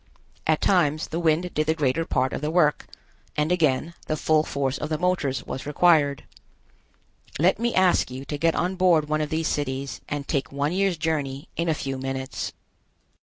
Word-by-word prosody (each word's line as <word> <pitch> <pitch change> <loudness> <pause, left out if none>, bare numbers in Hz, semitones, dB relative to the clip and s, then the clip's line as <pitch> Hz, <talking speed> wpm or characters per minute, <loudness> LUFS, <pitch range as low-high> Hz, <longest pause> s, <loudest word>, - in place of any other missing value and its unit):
At 155 -1 +2
times 155 -5 +2
the 165 - -2
wind 170 +2 +1
did 155 0 0
the 160 - +2
greater 155 +1 0
part 130 -3 0
of - - -3
the 150 - -1
work, 155 -3 +2 0.5
and 150 +3 +1
again 160 -2 +1
the 155 - -1
full 155 +1 +3
force 140 -3 -2
of 150 - -4
the 155 - 0
motors 150 -8 0
was 135 - -6
required. 150 -3 +3 1.1
Let 180 +7 +3
me 235 0 0
ask 185 -6 +3
you 130 +2 -7
to 145 - -4
get 165 +1 +2
on 185 +1 -1
board 170 -5 +4
one 155 0 +1
of 150 - -2
these 160 0 -1
cities, 135 -1 -3
and 145 -1 -4
take 140 -2 -1
one 140 +2 -1
year's 190 -1 +1
journey 150 -2 -2
in 170 0 -1
a 160 - +2
few 135 -2 -4
minutes. 135 0 -4
155 Hz, 190 wpm, -25 LUFS, 140-170 Hz, 1.1 s, board